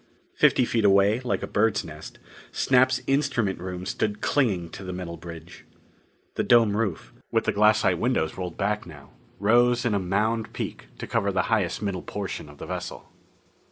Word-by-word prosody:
Fifty 125 - +4
feet 115 -2 0
away, 100 +2 +4
like 125 -1 -2
a - - -3
bird's 105 0 +1
nest, 75 0 -10 0.3
Snap's 130 -1 +3
instrument 135 - 0
room 90 0 -6
stood 105 +1 -2
clinging 100 - 0
to 100 - -9
the 90 - -5
metal 90 -2 -5
bridge. 85 0 -11 0.7
The - - -1
dome 115 -4 +4
roof, 105 -6 -2 0.2
with - - +2
the - - +1
glassite 105 -4 +3
windows 115 -10 0
rolled 90 -2 -5
back 105 -1 -1
now, 75 -5 -13 0.3
rose 120 +4 +3
in 115 - +1
a 100 - +2
mound 105 +4 -1
peak - - -5
to - - -6
cover 100 0 0
the 95 -1 +1
highest 105 -2 0
middle 95 -3 -2
portion 100 -7 -5
of 75 - -14
the - - -8
vessel. - - -6
100 Hz, 175 wpm, -25 LUFS, 90-115 Hz, 0.7 s, Fifty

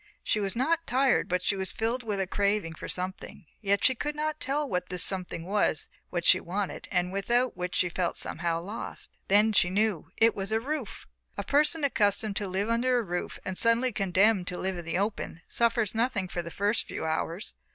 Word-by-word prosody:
She 215 - +1
was 200 0 -2
not 325 +7 +1
tired, 260 +1 +3
but 180 0 0
she 200 - +1
was 190 -1 -3
filled 230 +3 -1
with 210 -4 -3
a 190 - +1
craving 200 -3 0
for - - -8
something, 185 0 -5 0.2
yet 200 -1 +1
she 260 - +6
could 295 +4 -3
not 310 0 -2
tell 295 -1 -1
what 180 -6 -2
this 180 -1 +3
something 180 -3 0
was 195 -6 +1 0.2
that 175 -1 -2
she - - +7
wanted 195 +2 -4
and 180 -1 +1
without 240 +6 +1
which 180 0 -4
she 180 - +3
felt 175 0 -2
somehow 165 0 -1
lost. 210 +5 -5 0.2
Then 210 +2 +4
she 180 - +4
knew 200 -3 0
it 225 0 +5
was 195 +1 -4
a 220 - +2
roof. 300 +6 -4 0.3
A - - -2
person 300 +2 +2
accustomed 210 -5 +1
to 205 - -2
live 190 +3 -1
under 245 +2 +2
a 240 - +1
roof 180 -3 -4
and 185 - -3
suddenly 235 +2 +3
condemned 195 -1 +2
to 180 - -4
live 190 0 -2
in 170 - -8
the 165 +1 -1
open 200 -4 -2
suffers 235 -3 +1
nothing 225 -4 0
for 175 - -3
the 170 - -7
first 205 +5 0
few - - -4
hours. 165 +4 -2
205 Hz, 210 wpm, -28 LUFS, 180-235 Hz, 0.3 s, she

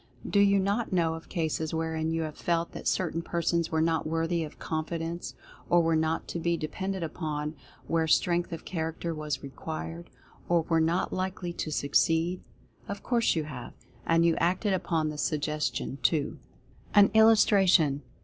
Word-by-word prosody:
Do 200 - +2
you 200 0 +5
not 200 +4 0
know 170 -3 +2
of 160 0 -9
cases 160 -2 -2
wherein 160 0 -1
you 165 0 -1
have 155 -1 -5
felt 170 -1 -1
that - - -6
certain 165 -3 0
persons 170 0 0
were 160 0 +2
not 160 -1 0
worthy 165 +1 0
of 150 - -9
Con 160 -1 -2
fidence; 165 +1 -5 0.3
or 175 0 +5
were 165 0 +2
not 160 +1 0
to 170 - -3
be 170 0 0
depended 190 +4 -3
upon 155 -2 -3 0.3
where 165 -1 +1
Strength 175 +2 +2
of 165 - -6
Character 165 -1 -3
was 150 -3 -4
required; 80 - -6 0.4
or 170 -1 +3
were 165 0 +2
not 165 +3 +1
likely 185 -1 -3
to 160 - -4
Succeed? 165 +5 +1 0.5
Of 200 0 -6
course 235 -5 +2
you 160 - 0
have, 135 -5 -8 0.3
and 165 0 +3
you 165 -1 +4
acted 185 +4 +1
upon 165 -4 0
the 150 -1 -6
Suggestion, 150 -3 -1
too. 155 -1 +1 0.6
AN 205 -1 +7
ILLUSTRATION. 195 -9 +5
165 Hz, 170 wpm, -28 LUFS, 155-175 Hz, 0.6 s, AN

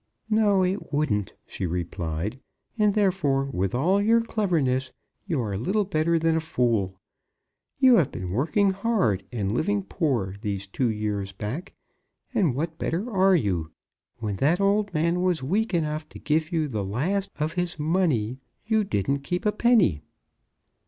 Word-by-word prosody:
"No; 205 -3 +4
it 185 +2 -2
wouldn't," 110 -10 0
she 95 - -4
replied. 85 +5 -3 0.4
"And, 210 -3 +2
therefore, 180 -10 +2
with 95 -6 -2
all 180 +10 +2
your 225 +3 +4
cleverness, 160 - 0 0.4
you 165 -7 0
are 105 -4 -3
little 200 - +1
better 170 -2 +1
than 165 0 +2
a - - +2
fool. 115 - 0 0.8
You 260 -3 +6
have 150 -6 +2
been 90 -1 -5
working 165 - +2
hard 195 - 0
and 105 -5 -2
living 200 - 0
poor 125 - -1
these 100 -3 -3
two 120 +6 -1
years 105 -2 -2
back, 120 - -5 0.6
and 185 - +2
what 160 +3 -3
better 195 +9 -2
are 190 -1 +4
you? 90 - -1 0.4
When 105 -3 -3
that 155 - +2
old 200 +1 +2
man 170 +2 +1
was 180 -6 +1
weak 205 - 0
enough 155 -3 -1
to - - -11
give 155 +2 0
you 160 -3 0
the 110 -7 -3
last 175 - -1
of 155 +2 -1
his 175 -1 -2
money, 150 - 0 0.3
you 220 -1 +2
didn't 140 - 0
keep 180 +8 -3
a 210 - +4
penny." 210 - +3
155 Hz, 160 wpm, -25 LUFS, -, 0.8 s, You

